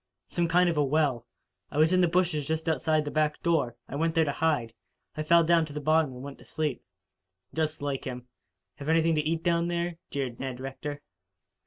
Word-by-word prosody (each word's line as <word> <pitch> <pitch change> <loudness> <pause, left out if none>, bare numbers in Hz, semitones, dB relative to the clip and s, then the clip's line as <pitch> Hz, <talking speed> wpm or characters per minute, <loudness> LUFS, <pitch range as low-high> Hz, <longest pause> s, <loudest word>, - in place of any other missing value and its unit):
"Some 170 -1 0
kind 180 +2 +4
of 170 -3 0
a 150 - +4
well. 140 -5 +1 0.4
It - - -5
was 160 +3 +4
in 185 - +4
the 175 - +5
bushes 165 -4 +1
just 160 +1 -2
outside 155 0 +1
the 145 - -3
back 150 +1 +1
door. 155 -9 +1
I - - -6
went 165 +2 0
there 165 -1 +4
to 145 - 0
hide. 145 -7 0 0.4
I 155 - -3
fell 170 +2 +5
down 165 0 +4
to 145 - -10
the 150 - -3
bottom 155 0 +2
and 125 0 -9
went 140 0 -8
to - - -14
sleep." 150 -5 -2 0.7
"Just 155 -2 -2
like 140 -2 -2
him. 125 -1 -5 0.5
Have 145 +1 -5
anything 165 0 +3
to 155 - +2
eat 160 +2 -1
down 170 -1 +2
there?" 170 -1 -2
jeered 130 -4 -3
Ned 130 -2 -4
Rector. 145 +2 -6
155 Hz, 215 wpm, -28 LUFS, 140-165 Hz, 0.7 s, the